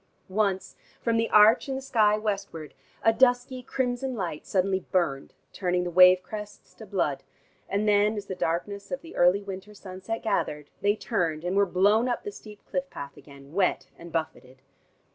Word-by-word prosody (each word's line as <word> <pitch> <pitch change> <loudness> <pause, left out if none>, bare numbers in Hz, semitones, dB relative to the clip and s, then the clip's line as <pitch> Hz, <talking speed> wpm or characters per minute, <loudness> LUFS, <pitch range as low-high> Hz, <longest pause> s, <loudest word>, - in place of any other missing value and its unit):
Once 195 -1 -1 0.2
from 230 -1 0
the 225 0 +1
arch 215 +6 +6
in 265 - -1
the - - -3
sky 215 -5 +3
westwards, 195 -7 -4 0.3
a 225 - +5
dusky 250 +1 +2
crimson 255 0 -2
light 175 -7 -4
suddenly 190 0 +1
burned, 170 -8 -2 0.2
turning 180 -2 0
the 175 - -4
wave 180 +1 +7
crests 210 0 -9
to - - -12
blood, - - -1 0.5
and 205 +2 0
then 210 +1 +3
as 205 - -5
the 190 - -5
darkness 190 +3 -3
of 270 - -3
the 335 - -11
early 180 +3 +4
winter 195 +1 -8
sunset 190 +3 -6
gathered, 150 -9 -2
they 205 +1 +3
turned, 170 -9 -2
and 180 +2 -2
were 200 0 +4
blown 205 +6 +3
up 245 - -2
the 415 - -5
steep 210 - -13
cliff 275 0 -3
path 140 0 -8
again, 140 0 -15
wet 190 0 0
and 170 0 -12
buffeted. 155 -5 -5
200 Hz, 180 wpm, -27 LUFS, 180-225 Hz, 0.5 s, wave